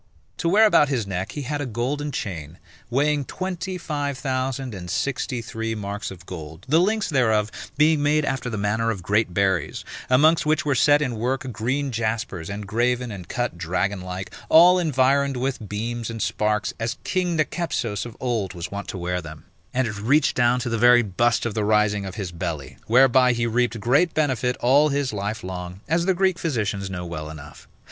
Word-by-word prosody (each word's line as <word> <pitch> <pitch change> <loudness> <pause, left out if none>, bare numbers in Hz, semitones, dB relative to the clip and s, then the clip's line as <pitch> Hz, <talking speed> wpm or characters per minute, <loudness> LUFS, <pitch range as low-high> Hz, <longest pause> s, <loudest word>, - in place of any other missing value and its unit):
To 170 - 0
wear 210 +5 +6
about 150 -9 +5
his 125 -6 0
neck, 95 -1 -4
he 145 - -4
had 145 +3 -3
a 145 - -3
golden 135 +6 -2
chain, 85 - -5 0.3
weighing 145 +3 +1
twenty 185 +4 -4
five 145 -5 -3
thousand 130 -2 -2
and 90 -3 -7
sixty 125 -1 -2
three 115 0 -4
marks 105 0 -4
of 90 -2 -11
gold, 80 -1 -9
the 155 +5 +4
links 215 +3 +1
thereof 110 -8 +2 0.3
being 150 0 +4
made 150 +1 +2
after 130 -2 -2
the 110 - -4
manner 105 +3 0
of 100 -5 -3
great 105 +2 +1
berries, 95 -1 0 0.2
amongst 155 +6 +5
which 155 -1 +1
were 145 - +2
set 145 +4 +4
in 125 -5 -3
work 130 +3 -2
green 130 +6 -1
jaspers 110 -6 -2
engraven 115 +5 -1
and 90 -4 -8
cut 120 -8 -2
dragon 95 +3 -1
like, 90 +1 -6 0.2
all 175 +3 +7
environed 140 -3 +2
with 125 -5 -3
beams 115 +2 -3
and 115 -2 -3
sparks, 105 0 0
as 115 +3 -2
king 180 -2 0
Nicepsos 155 -9 -1
of 120 -2 -9
old 115 -7 -2
was 85 -1 -6
wont 100 0 -5
to - - -5
wear 90 0 -2
them: 75 -2 -10 0.3
and 130 -1 0
it 105 -2 -5
reached 135 +9 +3
down 120 0 +3
to 120 - -2
the 115 -1 -1
very 120 +1 +6
bust 120 +5 +1
of 115 - -2
the 110 - -1
rising 105 -1 +2
of 95 - -7
his 100 -5 -4
belly, 80 -7 -5
whereby 125 +1 +5
he 115 0 0
reaped 120 0 0
great 140 - +2
benefit 130 -5 +1
all 140 +5 +5
his 140 -4 -1
life 105 +3 -3
long, 90 0 -6
as 170 +3 +1
the 190 - +3
Greek 190 -1 +1
physicians 105 - -2
know 90 -2 -5
well 75 -3 -6
enough. 75 -2 -11
120 Hz, 195 wpm, -23 LUFS, 100-140 Hz, 0.3 s, all